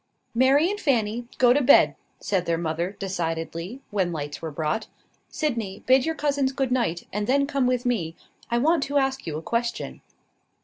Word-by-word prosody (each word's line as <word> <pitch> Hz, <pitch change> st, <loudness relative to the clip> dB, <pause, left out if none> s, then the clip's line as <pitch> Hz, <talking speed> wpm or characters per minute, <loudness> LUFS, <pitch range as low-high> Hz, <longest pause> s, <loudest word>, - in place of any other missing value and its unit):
"Mary 265 Hz, +6 st, +4 dB
and 415 Hz, -, -4 dB
Fanny, 235 Hz, -, 0 dB
go 245 Hz, -1 st, +6 dB
to 290 Hz, -, +2 dB
bed," 270 Hz, +1 st, +6 dB, 0.3 s
said 185 Hz, -3 st, -1 dB
their 165 Hz, -1 st, +1 dB
mother, 170 Hz, +3 st, -2 dB
decidedly, 170 Hz, +4 st, -4 dB
when 190 Hz, -4 st, 0 dB
lights 145 Hz, -2 st, -5 dB
were 160 Hz, -, -4 dB
brought. 155 Hz, +8 st, -2 dB, 0.4 s
"Sydney, 230 Hz, -11 st, -3 dB
bid 260 Hz, +2 st, +4 dB
your 320 Hz, -, 0 dB
cousins 285 Hz, -3 st, 0 dB
good 265 Hz, -2 st, -1 dB
night, 230 Hz, -10 st, 0 dB
and 210 Hz, +1 st, -2 dB
then 280 Hz, +2 st, +3 dB
come 275 Hz, -3 st, 0 dB
with 250 Hz, 0 st, 0 dB
me; 180 Hz, -10 st, -1 dB, 0.3 s
I 235 Hz, -, +1 dB
want 315 Hz, +5 st, +3 dB
to 285 Hz, +1 st, -1 dB
ask 270 Hz, -3 st, 0 dB
you 155 Hz, -2 st, -3 dB
a 160 Hz, -, -7 dB
question." 235 Hz, +3 st, -2 dB
235 Hz, 180 wpm, -25 LUFS, 175-270 Hz, 0.4 s, go